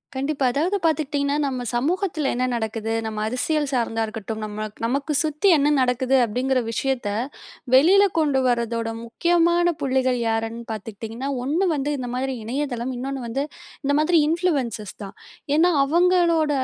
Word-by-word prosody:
கண்டிப்பா, 275 +1 -1
அதாவது 335 +10 0
பார்த்துக்கிட்டீங்கன்னா, 290 -2 0
நம்ம 255 -3 -3
சமூகத்தில 315 +2 0
என்ன 250 +1 0
நடக்குது. 225 -1 -2
நம்ம 215 -1 -4
அரசியல் 290 +6 0
சார்ந்தா 230 -3 0
இருக்கட்டும். 220 0 -6
நம்ம 215 0 -5 0.2
நமக்கு 280 +5 -1
சுத்தி 305 +4 0
என்ன 285 0 +2
நடக்குது 255 +1 +1
அப்படிங்கிற 255 +4 0
விஷயத்த, 255 -2 -1 0.6
வெளில 340 +10 +7 0.2
கொண்டு 290 -4 +2
வருவதோட 235 -1 0 0.2
முக்கியமான 345 +7 +2 0.2
புள்ளிகள் 260 -2 +1
யார்ன்னு 225 +1 -2
பார்த்துக்கிட்டீங்கன்னா, 225 +4 -6
ஒன்னு 315 +9 +1
வந்து 290 +1 -1
இந்த 250 -2 -4
மாதிரி 265 +1 -1
இணையதளம், 255 0 -2
இன்னொன்னு 270 +2 -4
வந்து 270 +5 -1 0.4
இந்த 285 +1 +1
மாதிரி 335 +3 +3
இன்ஃப்ளூயன்ஸ் 285 - -1
தான். 195 - -9 0.4
ஏன்னா 335 +3 +5
அவங்களோட 340 0 +3
265 Hz, 135 wpm, -23 LUFS, 235-305 Hz, 0.6 s, வெளில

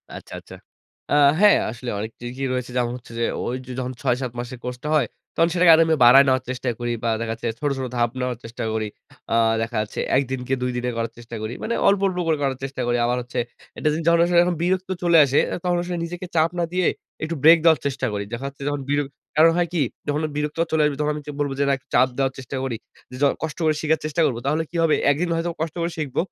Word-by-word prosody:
আচ্ছা, - - -10
আচ্ছা। - - -14 0.6
আ - - +2 0.3
হ্যাঁ 210 0 +7
আসলেই 120 0 -5
অনেকটি 110 +3 -7
কি 135 - -4
রয়েছে 125 -1 -3
যেমন 120 -1 +1
হচ্ছে 120 - -15
যে 115 - +1 0.2
ওই 125 - -2
যে - - -7
যখন 130 0 -3
৬ 125 -3 +2
৭ 125 -3 -3
মাসের 125 +1 -6
কোর্সটা 125 +3 -5
হয় 140 -6 +3 0.3
তখন 165 +1 +3
সেটাকে 175 -1 +6
আরও 165 - +6
আমি 160 - +3
বাড়ায় 135 +3 +8
নেওয়ার 130 -1 +2
চেষ্টা 130 0 -2
করি 120 0 -2
বা 115 - +1
দেখাচ্ছে 115 +1 -3
ছোট, 145 - 0
ছোট 130 - -3
ধাপ 120 0 +2
নেওয়ার 125 -2 -2
চেষ্টা 115 +1 -6
করি। 110 -1 -1 0.4
আ - - +2 0.3
দেখা 115 0 -3
যাচ্ছে 110 - -6 0.2
১ 135 - +5
দিনকে 130 0 -2
২ 125 - 0
দিনে 125 0 -1
করার 115 0 -2
চেষ্টা 120 0 -9
করি। 110 +2 -4
মানে 235 - -1
অল্প, 200 -1 +4
অল্প 185 -2 -3
করে 160 -2 +2
করার 135 -2 0
চেষ্টা 135 -1 -4
করি। 120 0 +2
আবার 125 +1 +1
হচ্ছে 120 0 -4 0.4
একটা 155 - -1
জিনিস 160 +2 -2
যখন 170 0 +5
আসলে 175 0 +2 0.3
বিরক্ত 185 +1 0
চলে 170 -1 +5
আসে 140 +1 +2
এ - - -1
তখন 180 -1 +1
আসলে 175 0 -4
নিজেকে 175 +2 -6
চাপ 160 +1 +4
না - - +2
দিয়ে 180 -2 +2 0.4
একটু 165 +1 -2
ব্রেক 165 +2 +9
দেওয়ার 165 -2 +5
চেষ্টা 135 -1 -1
করি। 100 0 -2
দেখা 120 +4 -4
যাচ্ছে 140 0 -10
যখন 145 -1 -1
বির 145 0 +2 0.4
কারণ 165 +1 +7
হয় 175 -1 +2
কি 165 - +1 0.3
যখন 145 +1 0
বিরক্ত 150 +1 -2
চলে 160 -1 +2
আসবে 145 -2 0
তখন 150 0 +1
আমি 150 - -5 0.2
বলব 145 -1 0
যে - - +3 0.3
চাপ 125 +2 +5
দেওয়ার 135 -1 +1
চেষ্টা 130 +1 -7
করি। 125 -4 -2 0.4
য - - +2 0.2
কষ্ট 155 -2 -4
করে 155 -1 +3
শিখার 160 0 +1
চেষ্টা 155 +2 0
করব। 120 - 0
তাহলে 155 +3 +1
কি - - -11
হবে 160 -2 +4 0.2
১ - - +1
দিন 180 - 0
হয়তো 165 +1 -1
কষ্ট 160 -1 -3
করে 170 +1 -1
শিখব। 150 -5 -4
140 Hz, 245 wpm, -23 LUFS, 125-160 Hz, 0.6 s, ব্রেক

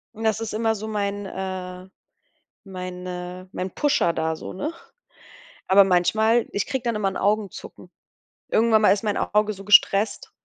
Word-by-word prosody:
Und 220 - -7
das 220 -1 +1
ist 225 -2 -4
immer 225 +1 0
so 215 +1 -6
mein, 205 -1 -3
äh 185 -1 -6 0.8
mein, 185 -2 -7
äh 180 0 -7
mein 185 +1 -4
Pusher 290 - +2
da 160 -1 -2
so, - - -8
ne? 300 - -4 1.0
Aber 195 +1 +7
manchmal 220 +6 +2
ich 200 - -1
kriege 265 -2 -3
dann 235 -2 -1
immer 205 -2 0
'n - - -5
Augenzucken. 200 -3 -3 0.6
Irgendwann 220 -1 +3
mal 210 - +5
ist 205 - -4
mein 210 -2 -1
Auge 210 +1 +1
so 195 0 -12
gestresst, 205 +1 +4
200 Hz, 165 wpm, -23 LUFS, 185-220 Hz, 1.0 s, Aber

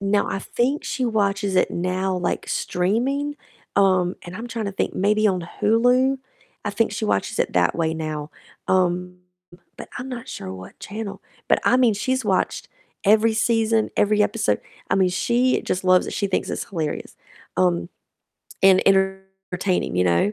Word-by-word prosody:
no, 200 +1 +1
I - - -2
think 250 +8 -1
she 260 - -2
watches 200 -4 0
it - - +3
now, 185 +2 -1
like, 180 -1 -2
streaming, 265 +11 -1 0.4
um, 185 -2 +3
and 175 +1 -8
I'm 230 +3 -6
trying 230 -2 -4
to 200 - -3
think, - - -2
maybe 210 +2 +2
on 185 -4 0
Hulu? 250 +5 +3 0.5
I 205 - -1
think 220 +1 0
she 215 +1 -3
watches 100 - -1
it - - 0
that 90 -1 +3
way 160 -1 0
now, 155 -1 -4 0.4
um, 180 -1 +1 0.6
but - - -9
I'm 250 +2 -6
not 245 -3 -7
sure 95 - -6
what 95 0 -11
channel. 210 -1 -6 0.3
But - - +4
I - - +5
mean, 245 -4 +4
she's 260 +5 -1
watched 190 -3 0 0.4
every 220 +2 +4
season, 225 -1 +2
every 210 +1 +3
episode, 205 0 0 0.3
I - - +3
mean, 190 -1 +4
she 240 +7 +2
just 185 +1 -2
loves 185 0 +4
it, - - -5
she 200 - -1
thinks 190 - -1
it's - - -3
hilarious, 160 -6 -4 0.4
um, 85 -2 +1 0.7
and 190 -1 +6
entertaining, 190 - 0
you 90 - +3
know? 85 +3 +2
195 Hz, 170 wpm, -23 LUFS, 180-225 Hz, 0.7 s, and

